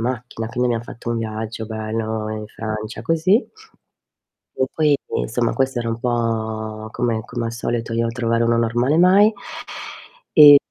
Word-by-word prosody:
macchina, 120 -1 -3
quindi 125 0 0
abbiamo 115 -1 -1
fatto 120 0 -7
un 115 - 0
viaggio 110 0 -4
bello 110 0 -3
in 110 0 -5
Francia, 110 0 -5
così 165 - +2 1.1
e 130 - +1
poi, 150 -2 +3 0.2
insomma, 115 - 0
questo 135 -2 0
era 115 - -3
un 115 0 -2
po' 110 -2 -2
come 115 -2 -1
come 120 0 -4
al 115 - -4
solito 115 0 -3
io 115 0 +1
trovare 115 -1 0
uno 115 0 +3
normale 120 +5 +2
mai. 190 +5 +6 1.1
E, 145 -1 +11
115 Hz, 150 wpm, -21 LUFS, 110-125 Hz, 1.1 s, E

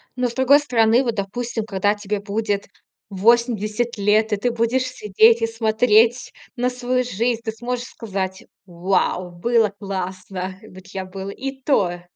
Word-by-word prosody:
Но, 250 0 0
с - - -9
другой 260 +3 +5
стороны, 240 -3 +3
вот, 235 -3 -1
допустим, 225 +3 -3
когда 205 0 +1
тебе 205 0 -3
будет 205 0 -2 0.4
80 230 +2 +1
лет, 210 +2 +2
и - - +1
ты 245 +4 0
будешь 235 +2 +1
сидеть 225 -1 +3
и 225 - +2
смотреть 225 +1 +2 0.2
на 250 0 0
свою 250 0 -1
жизнь, 235 0 -1
ты 225 - -2
сможешь 240 +2 -4
сказать: 190 -6 -5 0.2
"Вау! 180 0 -1
Было 220 +4 +1
классно! 185 -1 -5
Вот 190 -1 -14
я 190 -1 -5
был 190 +1 -7
и 270 +5 -6
то, 180 -11 +1
220 Hz, 155 wpm, -21 LUFS, 195-240 Hz, 0.4 s, другой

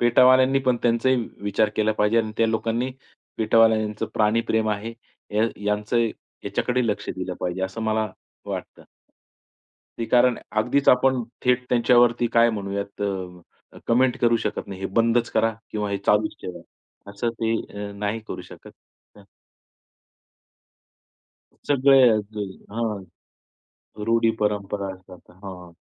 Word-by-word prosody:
पेटावाल्यांनी 130 +2 +5
पण 125 -1 +3
त्यांचाही 120 +2 +2 0.3
विचार 105 +1 +1
केला 110 0 +2
पाहिजे 105 +2 +2
आणि 110 - -6
त्या 115 - +3
लोकांनी 115 +3 -1 0.5
पेटवाल्यांचं 110 -1 +3
प्राणी 110 +1 +2
प्रेम 110 -1 +1
आहे. 105 +3 -3 0.4
या 110 +2 +3 0.2
यांचं 105 +3 0 0.5
याच्याकडे 125 -1 0
लक्ष 105 - -2
दिलं 90 -1 -4
पाहिजे 90 +1 -3
असं 95 +4 -4
मला 110 0 0 0.4
वाटतं. - - -7 1.1
ते 115 - -1
कारण 125 0 +3 0.2
अगदीच 130 +6 +1
आपण 125 0 +4 0.2
थेट 125 0 +2
त्यांच्यावरती 120 0 +4
काय 115 0 +5
म्हणूयात 100 -1 -4
अ, 90 -3 -7
कमेंट 125 +2 +3
करू 120 -1 +4
शकत - - -3
नाही. 95 -1 -8
हे 95 - -2
बंदच 115 +3 +1
करा 115 0 +2 0.2
किंवा 105 -1 -3
हे 100 - -1
चालूच 105 0 +2
ठेवा. 90 - -7 0.5
असं 105 +4 -2
ते 115 0 +1 0.3
अ, - - -9
नाही 105 +2 -2
करू - - -6
शकत. - - -13 0.5
हं. 100 - -16 2.4
सगळ्या 135 -3 +6
अगदी. 105 0 -3 0.3
हां. 110 -3 -3 1.0
रूढी 115 0 +3
परंपरा 100 -2 -1
असतात, 95 -1 -16
हां. 90 -3 -9
110 Hz, 130 wpm, -24 LUFS, 100-120 Hz, 2.4 s, सगळ्या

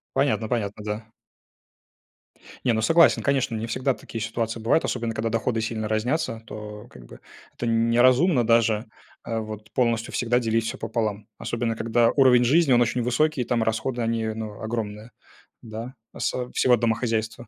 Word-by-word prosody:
Понятно 125 -6 +1
понятно, 105 -4 -2
да. 105 +1 -5 1.6
Не, 120 - +3
ну, 110 - 0
согласен, 165 +9 +5
конечно, 135 -5 +1
не 110 +1 -3
всегда 130 +3 0
такие 115 -2 -8
ситуации 115 0 -3
бывают, 115 +8 +2
особенно 115 -2 -2
когда 115 +1 -2
доходы 115 0 -1
сильно 110 -1 -3
разнятся. 115 +2 -1
То, 105 -1 -8
как 60 -1 -14
бы, - - -13 0.4
это 120 - -4
н 115 0 +2
неразумно 125 +3 +4
даже, 115 -1 +3 0.4
а 115 -1 -3
вот 110 0 -8
полностью 115 -2 0
всегда 120 0 +1
делить 115 -1 0
все - - -4
пополам, 110 -2 -3
особенно 115 0 -2
когда 115 +1 +2
уровень 130 -3 +5
жизни 140 +2 +4
он 120 - +5
очень 120 +1 +1
высокий, 130 +3 +1
там 120 -1 0
расходы 110 +3 -1
они, 115 0 -1
ну, 110 -1 -5
огромные, 110 0 -4 0.5
да, 115 +3 -7 0.2
осо 125 -1 -2
всего 125 -1 +4
домохозяйства. 115 0 -1
115 Hz, 160 wpm, -24 LUFS, 110-125 Hz, 1.6 s, согласен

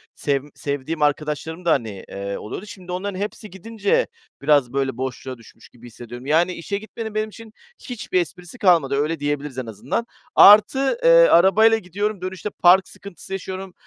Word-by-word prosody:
sevm 140 0 -2
sevdiğim 145 +2 -4
arkadaşlarım 150 +3 -2
da, - - +3
hani, 110 -7 -1
eee, 100 0 -5
oluyordu. 175 - -7
Şimdi 185 -3 -10
onların 185 +1 -4
hepsi 210 +1 -5
gidince 205 +2 -1 0.3
biraz 140 -3 +2
böyle, 135 -1 -1
boşluğa 130 0 -5
düşmüş 115 0 -18
gibi 120 0 -15
hissediyorum. 120 +2 -11
Yani 165 +5 +2
işe 200 +4 -4
gitmenin 220 +1 -8
benim 215 0 -1
için 220 0 -13 0.3
hiçbir 215 -7 -2
esprisi 180 +5 -9
kalmadı, 165 - +3
öyle 150 +3 -1
diyebiliriz 145 -2 -3
en 130 - -3
azından. 115 - -4 0.3
Artı, 265 - +6
eee, - - +5 0.2
arabayla 220 +5 +5
gidiyorum, 205 +1 -4
dönüşte 185 +2 -5
park 185 +1 +4
sıkıntısı 195 0 -11
yaşıyorum. 190 -1 -6
175 Hz, 160 wpm, -21 LUFS, 140-200 Hz, 0.3 s, Artı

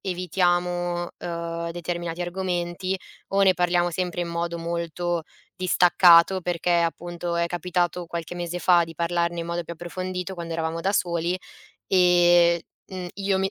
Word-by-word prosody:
evitiamo, 175 -1 0
uhm, 170 0 -4
determinati 175 0 -4
argomenti 180 +1 -2 0.3
o 195 0 +1
ne 190 - +6
parliamo 175 0 +2
sempre 175 0 -2
in 175 - -2
modo 170 0 -2
molto 170 0 -2 0.3
distaccato, 180 0 +5
perché 175 0 -2
appunto 175 +1 -3
è 170 0 +1
capitato 175 0 -1
qualche 170 +1 -5
mese 175 0 -4
fa 175 -2 +5
di 165 0 -11
parlarne 170 0 -1
in 165 - -5
modo 170 0 -3
più 170 - -7
approfondito 180 +2 -5
quando 170 -2 -6
eravamo 165 0 -2
da 195 +3 +1
soli 175 -2 0 0.5
e, 175 -2 +5 0.3
uhm, 185 -2 -6
io 195 -1 0
mi 190 0 0
175 Hz, 145 wpm, -25 LUFS, 170-180 Hz, 0.5 s, ne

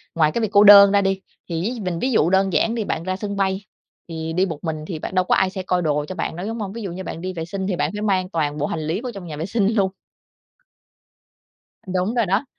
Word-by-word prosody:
ngoài 155 -2 +3
cái 235 - -2
việc 220 - 0
cô 205 -1 +6
đơn 200 -1 +10
ra 200 0 +4
đi, 195 0 0 0.3
thì 165 -1 -2
ví 235 +6 -3
mình 180 -5 -3
ví 260 - 0
dụ 170 -8 +3
đơn 190 -1 +2
giản 225 - +2
đi, 225 - -1
bạn 165 -4 -3
ra 185 +1 -2
sân 200 +1 -4
bay 195 0 -1 0.4
thì 160 -1 -5
đi 185 +3 +2
một 165 -6 -5
mình 155 -2 -4
thì 165 -4 -5
bạn 190 - -6
đâu 185 0 +3
có - - +3
ai 190 - +2
sẽ 190 0 -6
coi 180 -1 0
đồ 150 -2 0
cho 185 - -6
bạn - - -3
đâu, 180 +4 -5
đúng 225 +1 -4
hông? 200 -2 -4
Ví 230 - -6
dụ 195 -4 -4
như 185 +2 -6
bạn 165 - -6
đi 185 0 -4
vệ 165 -2 -4
sinh 190 +2 -4
thì 190 - -1
bạn 165 - -1
phải 210 - -4
mang 190 -3 0
toàn 150 -4 -1
bộ 145 - -1
hành 155 -2 -4
lý 175 +7 -1
vô 250 -1 -5
trong 195 -3 -8
nhà 150 -2 -6
vệ 160 - -3
sinh 200 +1 +1
luôn. 195 -3 +2 2.0
Đúng 185 +5 -1
rồi 235 -2 +2
đó. 195 +8 0
190 Hz, 285 wpm, -22 LUFS, 165-200 Hz, 2.0 s, đơn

